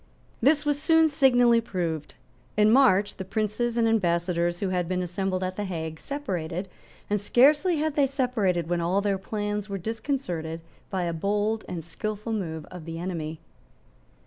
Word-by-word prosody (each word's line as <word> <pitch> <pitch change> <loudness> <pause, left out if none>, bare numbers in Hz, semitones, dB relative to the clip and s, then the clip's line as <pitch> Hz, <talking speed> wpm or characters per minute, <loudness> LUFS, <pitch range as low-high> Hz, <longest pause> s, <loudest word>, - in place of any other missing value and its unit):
This 295 +4 +4
was 290 0 0
soon 325 0 +5
signally 245 -5 +4
proved. 170 -8 -3 0.4
In 210 0 +5
March 215 -6 +4
the 190 - -4
princes 215 +4 -1
and 230 -1 +3
ambassadors 175 -4 +1
who 195 - -1
had 180 -2 0
been 180 0 -1
assembled 185 +1 -2
at 185 0 -3
the 210 - -1
Hague 160 -4 -4
separated 185 - -4 0.4
and 205 -1 0
scarcely 295 - +4
had 310 0 0
they 280 -2 +4
separated 225 - 0
when 175 0 0
all 180 +4 +1
their 200 -1 0
plans 210 +1 -3
were 200 - -2
disconcerted 185 - -3 0.3
by 185 -2 -1
a 170 -1 -1
bold 205 +5 0
and 170 -3 -5
skilful 215 +6 -4
move 160 -7 -3
of 180 -3 -9
the 165 0 -6
enemy. 165 -3 -4
200 Hz, 165 wpm, -26 LUFS, 175-235 Hz, 0.4 s, soon